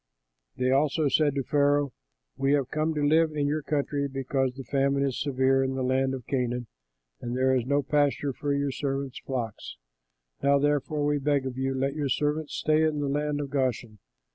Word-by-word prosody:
They 130 0 +1
also 145 +2 +2
said 145 +1 +2
to 135 - 0
Pharaoh, 145 -1 +2 0.4
"We 135 +1 +1
have 140 -3 0
come 155 +1 0
to 150 - 0
live 160 +1 +3
in 145 -1 0
your 150 +2 0
country; 145 -1 -1
because 135 -1 -1
the 135 - -7
famine 140 +2 +1
is 135 -3 -1
severe 135 -1 +2
in 130 0 -2
the 130 - -1
land 130 +1 +1
of 125 -3 -9
Canaan, 125 -2 -1 0.6
and 120 +1 -3
there 130 0 +3
is 125 -2 0
no 140 +1 +2
pasture 145 0 +1
for 145 +3 -3
your 140 0 0
servants' 135 -1 -3
flocks. 115 - -5 0.6
Now, 140 0 +4
therefore, 145 +1 0
we 145 0 +1
beg 140 -1 +1
of 130 -2 -4
you, 135 +1 -1
let 135 +1 0
your 145 -2 -2
servants 150 +3 -1
stay 155 0 +2
in 155 -2 +1
the 145 -1 -1
land 150 +1 -1
of 140 -2 -4
Goshen." 125 -6 -1
140 Hz, 195 wpm, -27 LUFS, 130-145 Hz, 0.6 s, Now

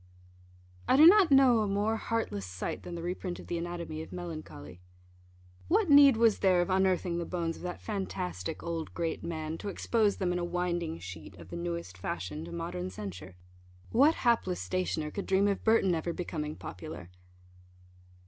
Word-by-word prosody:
I - - +4
do 305 - +9
not 380 0 +8
know 265 -4 +6
a 215 - +1
more 205 +3 0
heartless 220 - -2
sight 90 +1 -4
than 175 - -7
the 170 - -6
reprint 180 0 -4
of - - -10
the 170 - -3
Anatomy 170 -2 -5
of 160 - -9
Melancholy. 155 - -8 0.9
What 395 -3 +2
need 280 -4 +8
was 225 -2 +4
there 185 -2 +4
of 175 +2 0
unearthing 185 -2 +1
the 170 - -3
bones 165 -2 -2
of - - -13
that 180 0 -6
fantastic 95 - -4
old 165 -1 -4
great 165 -2 -2
man, 160 -1 -4
to 205 - -4
expose 210 +1 +1
them 180 -2 0
in 180 - -1
a - - -2
winding 175 - -2
sheet 90 +2 -9
of 85 -1 -12
the 85 - -7
newest 85 +1 -5
fashion 85 -4 -4
to 85 - -9
modern 90 +1 -4
censure? 95 -1 -8 0.6
what 285 +7 +5
hapless 225 -7 +2
stationer 170 -4 -2
could 200 - -5
dream 195 +1 +3
of 200 -1 -1
Burton 220 -5 +4
ever 170 +1 -2
becoming 155 -4 -4
popular? 90 -1 -9
175 Hz, 175 wpm, -30 LUFS, -, 0.9 s, do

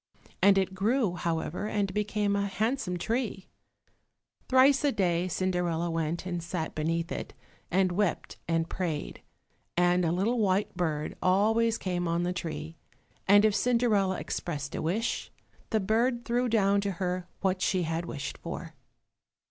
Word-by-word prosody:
And 195 0 +6
it 190 -1 +1
grew, 210 +1 +1
however, 170 +3 -2
and 200 -3 -1
became 210 0 0
a 200 0 0
handsome 215 -2 -1
tree. 220 -1 -2 1.0
Thrice 265 +2 +5
a 290 - +3
day 180 -5 +1
Cinderella 175 -2 -1
went 165 +1 -2
and 175 -2 -3
sat 170 -1 -4
beneath 165 +2 -1
it, - - -5 0.3
and 185 0 +2
wept 190 0 -1
and 165 -1 +1
prayed, 165 -5 -3 0.6
and 175 0 +3
a 165 - +2
little 210 +8 +1
white 200 -1 +1
bird 155 -4 -2
always 220 +5 +3
came 180 -3 -2
on 170 +1 0
the 180 +1 -1
tree, 160 -2 -5 0.5
and 205 +2 +7
if 215 - +4
Cinderella 210 -4 +2
expressed 145 -3 -4
a - - -3
wish, 205 +9 -1 0.4
the 220 - +2
bird 235 +4 +1
threw 245 +1 +1
down 200 -3 +3
to 200 -1 -2
her 180 0 -2
what 190 -1 0
she 185 -2 +1
had 165 +1 -2
wished 140 -3 -5
for. - - -6
185 Hz, 150 wpm, -29 LUFS, 170-210 Hz, 1.0 s, and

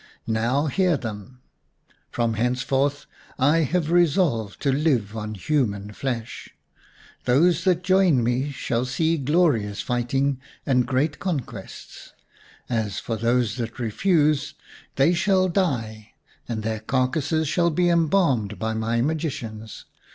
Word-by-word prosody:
" - - -46
Now, 115 +6 0
hear 175 +2 +2
them! 115 +2 -8 0.7
From 115 -1 -1
henceforth 130 +5 0 0.3
I 145 +5 +3
have 165 +1 0
resolved 155 - +2
to 140 - +2
live 130 -8 +1
on 110 0 -5
human 105 -4 -1
flesh. 120 -2 -5 0.8
Those 165 +10 +3
that 180 -2 +2
join 185 -8 +3
me 125 +4 0
shall 125 -3 -2
see 160 +5 0
glorious 135 - +1
fighting 130 +3 0 0.3
and 125 -3 +2
great 140 +4 0
conquests. 135 - -6 0.5
As 110 -5 -2
for 115 - -3
those 115 0 0
that 115 -2 -5
refuse, 150 - +1 0.4
they 140 +6 +4
shall 185 +1 +2
die, 115 - -2 0.4
and 110 -2 -3
their 110 0 -2
carcases 135 +7 0
shall 170 +3 +2
be 175 +2 +1
embalmed 160 - +2
by 110 +4 -2
my 115 +1 0
magicians. 125 -8 -4
130 Hz, 125 wpm, -24 LUFS, 115-160 Hz, 0.8 s, they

